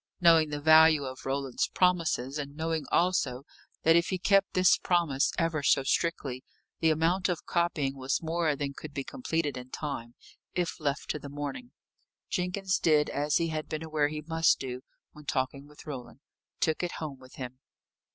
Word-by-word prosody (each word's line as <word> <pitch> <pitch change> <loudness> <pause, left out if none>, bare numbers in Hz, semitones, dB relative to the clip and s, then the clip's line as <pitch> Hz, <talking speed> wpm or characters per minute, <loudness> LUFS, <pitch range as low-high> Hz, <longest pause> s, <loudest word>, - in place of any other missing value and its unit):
Knowing 165 -3 +5
the 145 0 -3
value 155 0 +6
of 130 0 -7
Roland's 135 -1 -1
promises, 165 -7 +1
and 140 0 -6
knowing 160 0 -2
also 145 -8 +1 0.4
that 165 +1 +6
if 170 0 +3
he 185 - -1
kept 195 +1 +2
this 185 0 +5
promise 165 -7 +1
ever 165 -2 0
so 135 - +3
strictly, 135 -4 -1 0.4
the 160 - +3
amount 170 +5 +2
of 175 - -2
copying 165 -6 0
was 135 0 -1
more 165 -2 0
than 140 0 -3
could 150 +1 -10
be 140 - -2
completed 165 - -2
in 125 0 -8
time, 130 -5 -5 0.4
if 175 -1 -1
left 145 -2 -2
to 150 - -4
the 140 - -9
morning, 145 - -5 0.6
Jenkins 185 +1 0
did 150 -2 +3
as 145 +2 0
he 165 0 +2
had 155 -1 -4
been 155 +1 -4
aware 155 -2 +1
he 150 +1 -5
must 165 +1 +3
do, 130 -1 -5 0.3
when 150 0 -14
talking 135 +1 -2
with 150 0 -15
Roland 135 -3 -8 0.4
took 160 -1 +1
it 175 -1 -2
home 145 -4 -6
with 130 0 -15
him. 130 -1 -7
155 Hz, 180 wpm, -29 LUFS, 140-165 Hz, 0.6 s, value